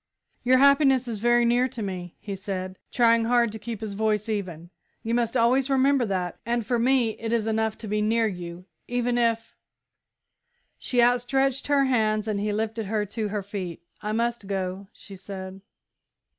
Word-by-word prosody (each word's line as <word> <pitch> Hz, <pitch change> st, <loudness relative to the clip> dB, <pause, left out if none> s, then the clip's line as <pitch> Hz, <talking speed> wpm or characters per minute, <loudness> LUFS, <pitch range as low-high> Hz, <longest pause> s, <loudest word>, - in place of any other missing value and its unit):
"Your 255 Hz, +1 st, +4 dB
happiness 275 Hz, -2 st, +5 dB
is 225 Hz, -3 st, -4 dB
very 240 Hz, +2 st, +3 dB
near 245 Hz, +2 st, +3 dB
to 230 Hz, -3 st, -6 dB
me," 180 Hz, -3 st, -5 dB
he 200 Hz, -2 st, -5 dB
said, 185 Hz, -1 st, -5 dB
trying 230 Hz, -1 st, +4 dB
hard 235 Hz, -1 st, +3 dB
to 220 Hz, -, -7 dB
keep 230 Hz, -1 st, -6 dB
his 215 Hz, -2 st, -4 dB
voice 215 Hz, 0 st, 0 dB
even, 180 Hz, -6 st, -4 dB, 0.3 s
"you 230 Hz, -, -2 dB
must 235 Hz, +1 st, +1 dB
always 255 Hz, +3 st, +3 dB
remember 270 Hz, -2 st, +3 dB
that. 180 Hz, -3 st, -2 dB
And 235 Hz, -1 st, -1 dB
for 240 Hz, 0 st, 0 dB
me, 245 Hz, -1 st, +3 dB
it 225 Hz, 0 st, -3 dB
is 230 Hz, -2 st, +1 dB
enough 220 Hz, 0 st, 0 dB
to 220 Hz, -, -8 dB
be 210 Hz, +1 st, 0 dB
near 225 Hz, +2 st, +2 dB
you, 175 Hz, -3 st, -5 dB, 0.2 s
even 245 Hz, 0 st, 0 dB
if 230 Hz, -1 st, 0 dB, 0.6 s
" -, -, -49 dB
She 245 Hz, -2 st, +1 dB, 0.2 s
stretched 270 Hz, +2 st, 0 dB
out -, -, +3 dB
her 275 Hz, -1 st, +4 dB
hands 215 Hz, -4 st, +1 dB
and 210 Hz, -2 st, -1 dB
he 210 Hz, +1 st, -1 dB
lifted 220 Hz, 0 st, -2 dB
her 210 Hz, 0 st, 0 dB
to 215 Hz, +1 st, -3 dB
her 205 Hz, -1 st, -3 dB
feet. 185 Hz, -4 st, -6 dB, 0.2 s
"I 210 Hz, 0 st, -3 dB
must 235 Hz, -1 st, -1 dB
go," 190 Hz, 0 st, -3 dB
she 200 Hz, -, -12 dB
said. 190 Hz, 0 st, -8 dB
220 Hz, 185 wpm, -25 LUFS, 200-240 Hz, 0.6 s, happiness